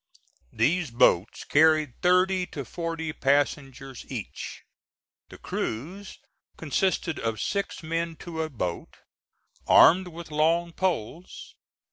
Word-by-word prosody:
These 175 -1 +1
boats 115 -5 +2
carried 155 -3 +3
thirty 180 +1 +3
to 140 -3 -7
forty 165 +2 -4
passengers 135 -2 -1
each. - - -7 0.7
The - - -12
crews 180 - -5 0.4
consisted 165 +1 -1
of 115 -1 -2
six 200 -3 -3
men 165 +1 -2
to 160 0 -6
a 160 - -3
boat, 90 - -5 0.7
armed 185 +2 +6
with 170 -2 -10
long 165 +3 +1
poles. 175 - -3
160 Hz, 105 wpm, -26 LUFS, 140-175 Hz, 0.7 s, armed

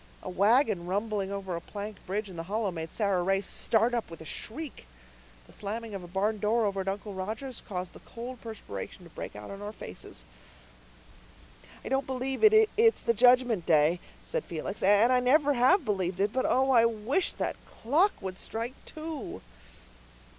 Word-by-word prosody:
A - - -5
wagon 205 -1 +3
rumbling 200 0 -1
over 195 -3 -3
a 170 - -4
plank 205 +2 -7
bridge 205 +3 -2
in 185 - -10
the 165 - -4
hollow 210 -1 0
made 160 -2 -5
Sara 200 -4 +1
Ray 195 +2 +2
start 225 +4 +1
up 235 -2 -1
with 165 - -9
a 160 - -10
shriek. 265 - -5 0.6
The - - -15
slamming 220 +2 -5
of 195 - -4
a - - -9
barn 205 +4 0
door 220 +2 +2
over 195 -1 0
at 190 - -7
Uncle 200 +1 -3
Roger's 220 +7 -5
caused 180 -2 -5
the - - -12
cold 240 +1 -8
perspiration 195 - -7
to 170 - -14
break - - -7
out 105 0 -8
on 200 0 -8
our 205 0 -5
faces. - - -10 1.6
"I - - -4
don't 270 0 0
believe 260 0 -2
it's 440 +1 +5
the 235 - +3
Judgment 245 -4 +4
Day," 155 +2 +4 0.2
said - - -2
Felix, 175 +4 -5
"and 205 +6 +5
I 250 - +5
never 285 +4 +4
have 275 +7 +4
believed 190 -4 -1
it. 205 +1 +1
But 260 - +1
oh, 265 +1 +3
I 235 -3 +6
wish 230 - +1
that - - -3
clock 320 - +2
would 190 -1 -5
strike 230 +3 -4
two." 310 -2 -6
215 Hz, 185 wpm, -29 LUFS, 190-250 Hz, 1.6 s, I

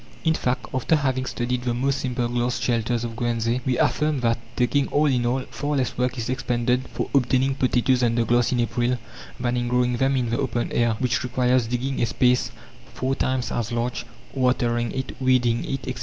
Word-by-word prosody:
In 160 - +3
fact, 125 -4 -1
after 130 +5 +2
having 130 -3 0
studied 125 0 -2
the 120 -1 -1
most 135 +3 0
simple 125 -2 -1
glass 120 0 -1
shelters 115 0 0
of 115 -1 -4
Guernsey, 120 +1 0
we 125 - +1
affirm 150 -1 +1
that, 115 -1 +1 0.2
taking 135 +3 +2
all 150 +1 +2
in 125 -4 +2
all, 130 +2 0
far 145 0 -2
less 130 -5 -1
work 125 +1 -1
is 115 - -3
expended 125 0 0
for - - -3
obtaining 135 0 +2
potatoes 130 -1 +2
under 120 -1 +2
glass 120 0 +2
in 125 -1 +1
April, 120 +1 0 0.4
than 125 0 0
in 120 0 -1
growing 125 0 +1
them 135 +2 +2
in 120 -3 -1
the 120 - 0
open 120 -3 -1
air, 120 -2 +2
which 125 0 0
requires 125 -1 +1
digging 125 +3 -2
a 120 - +2
space 125 +4 +2 0.5
four 130 +2 -1
times 130 -1 -1
as 120 -1 -2
large, 120 +1 -2 0.3
watering 120 -3 +1
it, 130 0 -4
weeding 125 -3 +2
it, 135 0 -3
etc. 130 -1 -4
125 Hz, 200 wpm, -24 LUFS, 120-130 Hz, 0.5 s, In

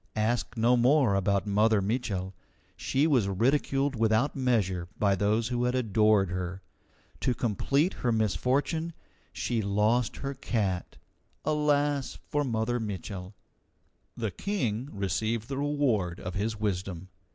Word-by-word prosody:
Ask 115 +3 -1
no 120 +2 +4
more 125 -1 +4
about 100 0 +1
Mother 105 +1 +3
Mitchel. 100 -3 -2 0.4
She 140 +3 +1
was 130 -10 +3
ridiculed 135 +6 +1
without 110 +4 +2
measure 105 -10 0
by 100 -2 +3
those 105 +4 +1
who 120 -1 0
had 125 +1 +1
adored 105 -5 +3
her. 90 +1 -4 0.6
To 125 - 0
complete 135 - +1
her 120 - -1
misfortune, 130 - 0 0.4
she 120 -2 -1
lost 105 +4 +1
her 135 0 -4
cat. 105 -9 -2 0.5
Alas 145 -2 +1
for 145 0 +1
Mother 120 -1 -1
Mitchel! 100 -2 -6 0.8
The 110 -3 -2
King 125 - -2
received 110 +3 -2
the 135 -1 -3
reward 125 -12 0
of 90 - -5
his 105 +2 -2
wisdom. 95 -3 -3
110 Hz, 130 wpm, -28 LUFS, 100-130 Hz, 0.8 s, no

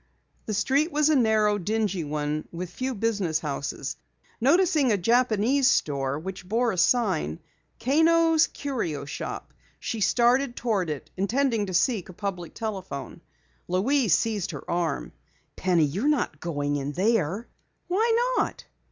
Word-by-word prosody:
The 215 - -1
street 275 - +2
was 300 +1 +3
a 310 - +4
narrow, 215 -4 +3
dingy 205 -2 -1
one 150 0 -3
with 175 +1 -6
few 255 +5 -3
business 200 -7 0
houses. 140 -3 -4 0.4
Noticing 295 -1 +3
a 205 - +3
Japanese 240 +5 +2
store 140 -2 0
which 185 +3 -7
bore 235 +2 +2
a 185 - -4
sign, 165 - +1 0.4
"Kano's 325 +4 +4
Curio 180 - -4
Shop," 140 - -6 0.3
she 225 - -4
started 245 +4 +3
toward 205 -8 -1
it, 150 -3 -6
intending 225 +2 +1
to 185 - -3
seek 210 -3 +1
a - - -9
public 180 -3 -5
telephone. 190 - -5 0.5
Louise 220 - +2
seized 210 -4 -1
her - - -7
arm. 165 - -1 0.4
"Penny, 175 -4 +2
you're 190 - -1
not 245 - 0
going 145 -4 -2
in 140 +1 -3
there!" 200 +2 0 0.4
"Why 460 +6 +2
not?" - - -2
210 Hz, 140 wpm, -26 LUFS, 170-255 Hz, 0.5 s, a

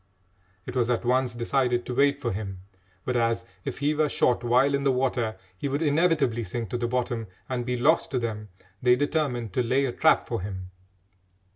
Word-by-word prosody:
It 125 - -7
was 120 -2 +1
at 120 0 0
once 125 -1 +1
decided 120 0 0
to 125 - -4
wait 140 +2 +3
for 120 -4 -2
him, 95 -2 -5 0.4
but 125 - -1
as, 115 -1 +1 0.2
if - - -4
he 145 +2 +1
were 155 0 +1
shot 125 -2 +2
while 125 +4 +3
in 140 - +1
the 140 - +3
water, 125 -4 0 0.2
he 120 - -3
would 140 +3 -1
inevitably 150 -6 +2
sink 110 +1 -4
to - - -1
the 120 - 0
bottom 120 -2 -2 0.2
and 125 -1 -3
be 125 0 0
lost 150 +7 +3
to 130 - -1
them, 105 -3 -3 0.3
they 125 0 +5
determined 130 - -1
to 125 - +2
lay 130 +3 +2
a 130 - -1
trap - - +3
for - - -2
him. 95 -2 -6
125 Hz, 205 wpm, -26 LUFS, 115-140 Hz, 0.4 s, they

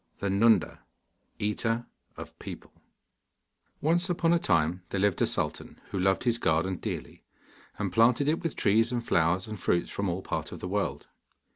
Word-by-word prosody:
THE 100 - -2
NUNDA, 100 -4 +3 0.6
EATER 115 +3 -1 0.3
OF - - -10
PEOPLE - - -9 1.1
Once 170 +4 +2
upon 170 -1 +2
a 170 - +3
time 85 - +1
there 100 - -2
lived 100 -2 +1
a - - +4
sultan - - -3
who 95 - -2
loved 95 +1 +2
his 120 -2 +1
garden 85 +2 +1
dearly, - - -6 0.5
and 100 -4 -3
planted 120 +6 +4
it 155 +2 +1
with 165 - -3
trees 110 +3 +3
and 120 -1 -2
flowers 85 +3 +2
and 110 -2 -7
fruits 85 0 0
from 100 -1 -2
all 90 +2 -3
parts - - -3
of - - -7
the - - -5
world. 100 +1 -2
105 Hz, 170 wpm, -28 LUFS, 90-120 Hz, 1.1 s, a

